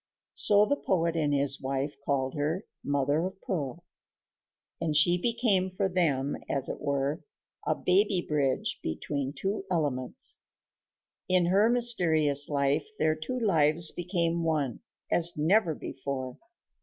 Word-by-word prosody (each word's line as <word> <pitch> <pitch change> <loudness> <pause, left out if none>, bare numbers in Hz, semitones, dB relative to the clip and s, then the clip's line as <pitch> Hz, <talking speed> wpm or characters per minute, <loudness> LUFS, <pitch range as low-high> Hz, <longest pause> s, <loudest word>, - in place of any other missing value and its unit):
So 205 0 +5
the 285 +5 0
poet 170 -7 0
and 150 -3 0
his 140 -1 +2
wife 135 +2 -2
called 135 -2 -1
her 155 +6 -2 0.2
Mother 145 +2 0
of 190 +1 -5
Pearl; 170 - -4 1.0
and 160 -2 -1
she 175 +4 +5
became 205 -2 +1
for 185 +1 -1
them, 150 -7 0
as 135 -2 -1
it - - -6
were, 140 0 -1 0.4
a - - +2
baby 195 +1 +2
bridge 145 -5 -1
between 140 - -3
two 195 +7 -3
elements. 145 -8 0 0.9
In 185 -1 +3
her 200 +5 +3
mysterious 160 - +3
life 140 +1 0
their 155 0 +2
two 160 +12 -4
lives 165 -6 +3
became 170 -1 -1
one, 150 -7 -1 0.3
as 170 -1 +2
never 165 +2 +2
before. 130 -2 -6
160 Hz, 130 wpm, -28 LUFS, 140-185 Hz, 1.0 s, So